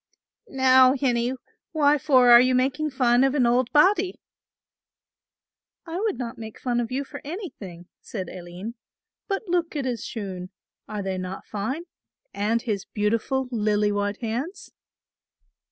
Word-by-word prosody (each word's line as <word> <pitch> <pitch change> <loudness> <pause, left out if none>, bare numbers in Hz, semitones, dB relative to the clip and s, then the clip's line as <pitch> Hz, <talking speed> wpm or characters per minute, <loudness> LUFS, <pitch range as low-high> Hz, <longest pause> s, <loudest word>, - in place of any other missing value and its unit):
"Now, 260 -3 +5
hinnie, 245 -2 0 0.4
why 295 -2 +3
for 260 -4 +5
are 240 0 +10
you 255 0 +3
making 265 +4 +1
fun 255 -2 +3
of 270 +1 +2
an 260 -4 +3
old 245 +1 +2
body?" 370 +4 +3 1.7
"I 335 +1 -4
would 425 -2 -1
not 235 -3 -6
make 220 -1 -9
fun 245 -2 -1
of 235 -1 -3
you 270 +2 -1
for - - -10
anything," 275 - -8 0.2
said 190 -5 -6
Aline; 180 +6 -8 0.5
"but 390 0 -2
look 345 -2 0
at 280 -3 -2
his 240 -4 -3
shoon; 185 -5 -6 0.4
are 210 -2 -4
they 190 -1 -3
not 185 +1 -6
fine, 225 +10 -3 0.5
and 225 +3 0
his 205 -4 -2
beautiful 230 +5 -1
lily 210 -2 +1
white 205 0 -1
hands?" 245 - -4
245 Hz, 145 wpm, -25 LUFS, 210-280 Hz, 1.7 s, are